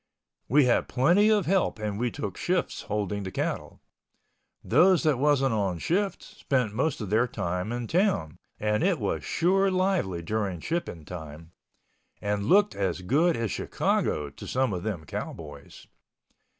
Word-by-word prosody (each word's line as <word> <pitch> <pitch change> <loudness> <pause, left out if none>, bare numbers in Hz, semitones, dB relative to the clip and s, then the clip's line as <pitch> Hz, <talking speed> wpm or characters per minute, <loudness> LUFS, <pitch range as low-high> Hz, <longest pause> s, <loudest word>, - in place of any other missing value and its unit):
We 140 +3 +5
had 125 - +2
plenty 175 +12 +4
of 210 -4 +3
help 190 +2 +1
and 105 -1 -3
we 120 +1 +1
took 145 - -5
shifts 180 -1 -1
holding 105 -1 -2
the 95 - -4
cattle. - - -4 0.8
Those 180 +1 +4
that 150 -6 +2
wasn't 135 -3 +3
on 100 -5 0
shift 195 - -1
spent 125 -6 -2
most 130 +3 -1
of 105 -3 -5
their 115 +3 +3
time 90 -1 -3
in 120 0 -3
town, 170 - 0 0.2
and 105 0 0
it 185 -1 +2
was 105 -6 -2
sure 195 +4 +2
lively 185 - 0
during 100 -2 -2
shipping 160 - -4
time—and 85 +5 -8
looked 205 +5 +4
as 95 -2 -2
good 155 - +2
as 115 -3 -2
Chicago 75 -2 -1
to - - -10
some 130 -4 0
of 90 - -3
them 90 -6 -4
cowboys. 75 -1 -8
115 Hz, 150 wpm, -27 LUFS, -, 0.8 s, We